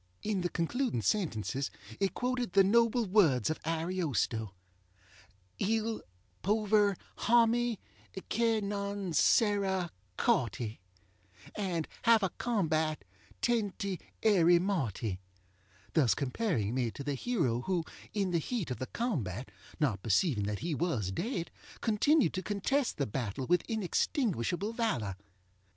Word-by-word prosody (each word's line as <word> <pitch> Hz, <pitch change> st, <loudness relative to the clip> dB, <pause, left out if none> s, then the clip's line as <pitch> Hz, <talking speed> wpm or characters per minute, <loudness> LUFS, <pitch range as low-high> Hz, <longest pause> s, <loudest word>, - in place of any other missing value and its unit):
In 205 Hz, -3 st, 0 dB
the 175 Hz, -, 0 dB
concluding 200 Hz, -, -1 dB
sentences 140 Hz, -, 0 dB, 0.3 s
it 195 Hz, -, 0 dB
quoted 250 Hz, -4 st, -1 dB
the 195 Hz, -, +7 dB
noble 230 Hz, +3 st, +3 dB
words 165 Hz, -, +3 dB
of 155 Hz, -, -5 dB
AriostoŌĆö 160 Hz, -, -1 dB, 1.1 s
Il 220 Hz, +2 st, 0 dB, 0.4 s
pover 210 Hz, 0 st, +3 dB, 0.2 s
hommy 235 Hz, -1 st, +3 dB, 0.5 s
che 225 Hz, -1 st, +2 dB
non 200 Hz, -2 st, -3 dB
sera 190 Hz, 0 st, +3 dB, 0.3 s
corty 120 Hz, -, 0 dB, 0.7 s
And 180 Hz, -6 st, -2 dB
have 230 Hz, -3 st, +5 dB
a 190 Hz, -, +1 dB
combat 160 Hz, -9 st, 0 dB, 0.4 s
tenty 200 Hz, -5 st, 0 dB, 0.2 s
erry 175 Hz, -5 st, +5 dB
morty; 120 Hz, -, -1 dB, 0.7 s
thus 125 Hz, -, +4 dB
comparing 135 Hz, -, -1 dB
me 125 Hz, -2 st, 0 dB
to 140 Hz, -, -7 dB
the 145 Hz, 0 st, -1 dB
hero 135 Hz, -, 0 dB
who, 175 Hz, +3 st, 0 dB, 0.3 s
in 195 Hz, -3 st, 0 dB
the 170 Hz, -, +2 dB
heat 195 Hz, -, -3 dB
of 125 Hz, -, -4 dB
the 130 Hz, -, -3 dB
combat, 130 Hz, -, -3 dB, 0.3 s
not 120 Hz, -11 st, +1 dB
perceiving 110 Hz, -, +2 dB
that 105 Hz, 0 st, -2 dB
he 170 Hz, -, 0 dB
was 140 Hz, -, -1 dB
dead, 175 Hz, -, -3 dB, 0.3 s
continued 260 Hz, +7 st, +3 dB
to 185 Hz, -, -2 dB
contest 230 Hz, +8 st, 0 dB
the 140 Hz, -, +1 dB
battle 120 Hz, +2 st, -3 dB
with 175 Hz, +5 st, +3 dB
inextinguishable 205 Hz, -, 0 dB
valor. 130 Hz, -, -1 dB
185 Hz, 120 wpm, -32 LUFS, 135-220 Hz, 1.1 s, the